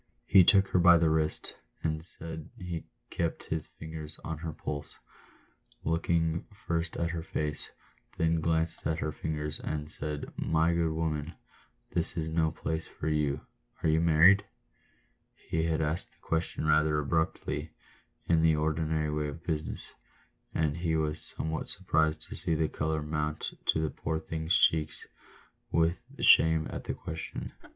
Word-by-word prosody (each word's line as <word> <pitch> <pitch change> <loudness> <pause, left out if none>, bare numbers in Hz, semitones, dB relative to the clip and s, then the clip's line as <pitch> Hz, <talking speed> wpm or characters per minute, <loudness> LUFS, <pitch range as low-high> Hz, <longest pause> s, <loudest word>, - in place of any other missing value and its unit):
He 95 0 +7
took 100 +2 +5
her 90 - +3
by 85 0 +8
the 80 -1 +3
wrist, 80 -1 0 0.3
and 80 -1 0
as 80 - -10 0.4
he 90 -5 -5 0.3
kept 85 -1 -1
his 80 -1 -1
fingers 80 -1 -5
on 80 -1 -4
her 80 0 -4
pulse, 75 -1 -5 0.9
looked 80 +1 -1 0.6
first 85 0 -1
at 85 0 0
her 85 -1 -3
face, 75 -2 -3 0.5
then 80 0 +2
glanced 80 0 0
at 80 0 0
her 75 -1 -1
figure, 75 0 -3
and 75 0 -3
said, 75 -1 -5
" - - -29 0.2
My 80 +2 +4
good 85 -1 +1
woman, 80 -1 -2 0.6
this 85 +1 -1
is 80 -1 -1
no 80 0 +2
place 80 0 -3
for 80 - -4
you 75 -2 +1 0.2
— - - -39
are - - +3
you 80 +1 +3
married?" 85 +5 +6 0.9
He 80 0 -2
had 80 -1 +1
asked 75 +3 -2
the - - -26
question 80 -1 -1
rather 75 0 +4
abruptly 80 +2 -1 0.3
— - - -40
in 80 -1 +4
the 80 -1 +5
ordinary 75 0 0
way 75 0 -1
of 75 +3 -7
business 80 -3 -3 0.4
— - - -40
and 75 -1 +1
he 85 -2 0
was 75 -1 0 0.2
somewhat 80 0 -2
surprised 80 0 +1
to - - -9
see 80 - -1
the 80 0 +2
colour 80 0 -1
mount 75 0 -2
to - - +4
the 80 -1 0
poor 80 0 -2
thing's 80 +2 0
cheeks 80 -1 +2 0.7
with 85 +2 +3 0.2
shame 80 -1 +6
at - - -6
the - - -2
question. 80 0 -6
80 Hz, 165 wpm, -30 LUFS, 75-80 Hz, 0.9 s, by